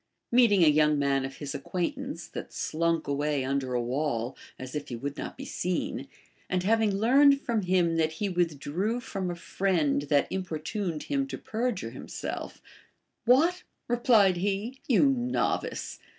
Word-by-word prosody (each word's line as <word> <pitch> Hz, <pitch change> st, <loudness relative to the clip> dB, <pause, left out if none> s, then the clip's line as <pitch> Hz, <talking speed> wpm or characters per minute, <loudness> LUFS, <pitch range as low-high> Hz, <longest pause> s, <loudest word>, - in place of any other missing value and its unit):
Meeting 230 Hz, -7 st, +5 dB
a -, -, +6 dB
young 150 Hz, 0 st, +4 dB
man 140 Hz, -1 st, +1 dB
of 135 Hz, 0 st, -7 dB
his 145 Hz, -2 st, -6 dB
acquaint 180 Hz, -, -2 dB
ance 275 Hz, +1 st, -6 dB
that -, -, -7 dB
slunk 165 Hz, 0 st, -1 dB
away 145 Hz, -1 st, 0 dB
under 135 Hz, -2 st, -1 dB
a 120 Hz, -, +1 dB
wall, 125 Hz, -1 st, -1 dB, 0.2 s
as 130 Hz, 0 st, -8 dB
if 150 Hz, -1 st, -4 dB
he 120 Hz, -, -4 dB
Avould 140 Hz, +4 st, -4 dB
not -, -, -6 dB
be -, -, -7 dB
seen, 180 Hz, -1 st, -2 dB, 0.4 s
and 180 Hz, 0 st, 0 dB
having 220 Hz, 0 st, +2 dB
learned 275 Hz, +6 st, +5 dB
from 230 Hz, -5 st, -1 dB
him 175 Hz, -3 st, +2 dB
that 160 Hz, -1 st, +1 dB
he 200 Hz, +6 st, -2 dB
withdrew 175 Hz, -, -1 dB
from 195 Hz, -6 st, -4 dB
a 175 Hz, -, -3 dB
friend 170 Hz, -5 st, 0 dB
that 145 Hz, -1 st, +4 dB
importuned 180 Hz, -1 st, -3 dB
hiin 275 Hz, -1 st, -1 dB
to -, -, -4 dB
perjure 225 Hz, -2 st, -2 dB
himself, -, -, -6 dB, 0.6 s
AVhat, 330 Hz, +9 st, +4 dB, 0.3 s
re 240 Hz, -, +1 dB
plied 210 Hz, -7 st, +5 dB
he, 205 Hz, +8 st, -2 dB
you 250 Hz, -1 st, +4 dB
novice 250 Hz, -2 st, -1 dB
180 Hz, 165 wpm, -28 LUFS, 150-230 Hz, 0.6 s, a